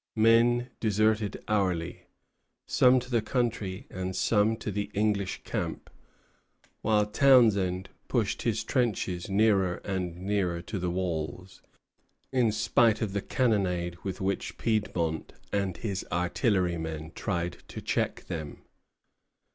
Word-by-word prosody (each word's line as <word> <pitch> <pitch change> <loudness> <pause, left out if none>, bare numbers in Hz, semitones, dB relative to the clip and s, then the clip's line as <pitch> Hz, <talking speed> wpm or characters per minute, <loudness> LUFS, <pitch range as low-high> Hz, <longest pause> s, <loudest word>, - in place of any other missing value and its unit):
Men 120 +2 +4
deserted 110 -1 +1
hourly, 90 -5 -1 0.6
some 130 0 +5
to 125 +1 -11
the 120 -2 +3
country, 110 -5 -2
and 95 0 -4
some 105 +2 +2
to 110 -1 -4
the 100 +1 -3
English 100 -2 0
camp; - - -4 0.9
while 105 -1 +3
Townshend 105 -7 +4 0.2
pushed - - 0
his - - 0
trenches 100 -8 -1
nearer 100 -3 +3
and 90 -3 -2
nearer 90 -3 -1
to 100 - -4
the 90 0 -1
walls, 90 0 -4 0.7
in 125 -4 +3
spite 110 +1 +3
of 100 -3 -3
the 100 - -1
cannonade 95 -9 0
with 95 +1 -5
which 95 +1 -1
Fiedmont 90 -8 -1 0.2
and 100 -3 0
his 100 -5 -3
artillerymen 85 - 0
tried 85 -4 -2
to - - -7
check - - -1
them. 80 -3 -6
100 Hz, 120 wpm, -28 LUFS, 90-110 Hz, 0.9 s, some